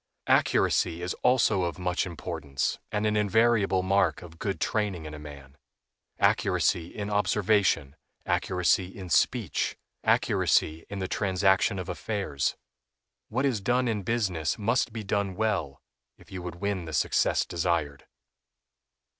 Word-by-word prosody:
Accuracy 85 0 +2
is 90 - -2
also 120 -6 +3
of 85 -1 -2
much 90 0 -1
importance, 80 -5 -3
and 105 0 -1
an 105 0 +1
invariable 105 -2 +3
mark 95 0 +1
of 80 -1 -13
good 100 -2 -2
training 100 -7 -1
in 75 - -7
a 75 - -8
man—accuracy 70 +3 -2
in 105 +2 -6
observation, 100 -8 +2 0.3
accuracy 90 0 +1
in 95 -1 -9
speech, - - +1 0.3
accuracy 80 +1 +2
in 100 - -5
the 95 -1 -2
transaction 95 +1 +2
of 90 -1 -5
affairs. 95 - -2 0.7
What 130 +5 0
is 120 -7 0
done 125 +5 +1
in 110 -3 -1
business 95 -7 -1
must 115 +3 +1
be 110 -1 -5
done 100 -1 -1
well 95 -10 -2 0.3
if - - -19
you 95 -1 -5
would 90 -1 -6
win 95 -1 -2
the 80 - -7
success - - +2
desired. 85 -5 -2
95 Hz, 135 wpm, -27 LUFS, 85-105 Hz, 0.7 s, also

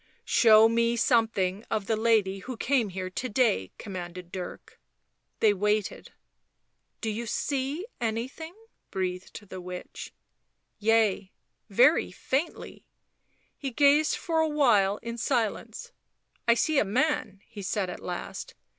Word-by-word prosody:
" - - -46
Show 220 -1 +6
me 230 +1 +2
something 220 -5 +1
of 215 -3 -1
the 220 - +1
lady 215 -3 +2
who 250 +4 -7
came 245 -3 +1
here 185 0 -5
to 255 +7 -4
day," 205 - +1
commanded 180 -2 -7
Dirk. 185 -2 -8 0.6
They 215 -2 +5
waited. 210 +1 -1 0.4
" - - -50
Do 220 - -1
ye 230 +2 -4
see 280 - -2
anything 250 +9 -4 0.2
?" - - -50
breathed 185 +2 -4
the 185 - -7
witch. 180 0 -8 0.4
" - - -50
Yea 215 -3 +2 0.2
— - - -51
very - - +4
faintly." 280 +6 -3 0.7
He 275 - -4
gazed 285 +4 +4
for 330 -2 -1
a 320 0 +2
while 215 -10 +3
in 235 0 -5
silence. 245 - -2 0.3
" - - -42
I 235 - +6
see 290 +5 +2
a - - +4
man," 210 -2 0
he 220 -4 -10
said 195 0 -1
at 180 - -6
last. 175 -1 -6
220 Hz, 145 wpm, -27 LUFS, 195-255 Hz, 0.7 s, Show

